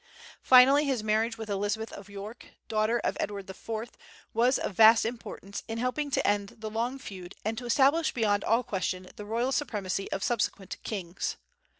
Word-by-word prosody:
Finally 265 +3 +7
his 260 -6 0
marriage 220 +2 +1
with 220 -1 -6
Elizabeth 205 +2 -2
of 200 0 -10
York, 205 +4 -9
daughter 215 +2 +1
of - - 0
Edward 200 -1 -3
IV, 220 +4 -6 0.4
was 245 +4 +3
of - - -3
vast 220 +3 +7
importance 225 -3 -6
in 225 - -4
helping 250 +5 -1
to - - +1
end 205 -1 0
the 220 -1 -6
long 235 +4 -1
feud 190 -8 -9
and 220 +1 0
to 245 +2 -6
establish 285 +6 +3
beyond 205 -4 +1
all 230 +3 +2
question 185 -3 -3
the 210 - -8
royal 235 +5 0
supremacy 205 -9 -2
of 195 - -2
subsequent 210 -5 -1
kings. 185 -4 -4
220 Hz, 175 wpm, -29 LUFS, 205-245 Hz, 0.4 s, Finally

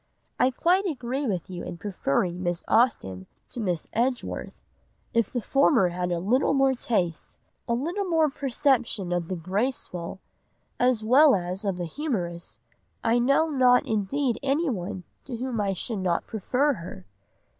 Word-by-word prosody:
I 255 - +5
quite 360 +9 +2
agree 270 -2 -2
with 185 -6 -2
you 180 -2 -6
in 175 - -6
preferring 180 -1 -1
Miss 175 -1 -2
Austen 95 - +1 0.2
to - - -6
Miss 180 -7 -1
Edgeworth. 245 +2 -2 0.5
If 230 -3 +2
the 245 - -2
former 275 - +4
had 180 0 -2
a 175 - +1
little 245 +11 +2
more 270 -1 +4
taste, 185 -10 -2 0.3
a 235 - +1
little 345 +11 -2
more 325 -3 +3
perception 260 -8 0
of 175 -2 -1
the 185 - -3
graceful, 185 -1 -3 0.6
as 245 -3 +2
well 270 +5 +6
as 180 +1 -3
of 195 -3 -1
the 175 - -3
humorous, 175 - -4 0.4
I 230 +1 +3
know 275 +6 +3
not 250 -3 +4
indeed 225 +4 0
anyone 240 - -1 0.2
to 250 -3 -5
whom 245 -2 -2
I 200 -1 0
should 210 +3 -3
not 180 -2 0
prefer 255 +7 0
her. 165 - -9
230 Hz, 155 wpm, -26 LUFS, 180-265 Hz, 0.6 s, well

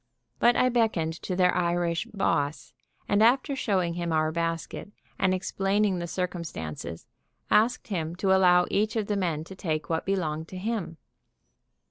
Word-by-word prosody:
But 240 0 +5
I 255 - +3
beckoned 220 -10 +1
to 185 - -3
their 180 0 +3
Irish 170 -1 0
"boss," 155 -8 -1 0.3
and 205 +1 +2
after 255 +5 +3
showing 185 -9 0
him 170 -1 -3
our 155 0 +2
basket 165 +4 -3 0.3
and 190 - +3
explaining 195 +1 0
the 170 - -4
circumstances, 165 - -5 0.5
asked 230 +2 +3
him 165 -4 -2
to 190 +1 +2
allow 180 -1 +5
each 215 +2 +1
of 220 -2 0
the 205 - -1
men 170 -6 -1
to 190 +4 -11
take 155 -4 -3
what 160 +3 -1
belonged 160 -5 -1
to 185 - -8
him. 195 -5 -3
180 Hz, 155 wpm, -27 LUFS, 165-200 Hz, 0.5 s, But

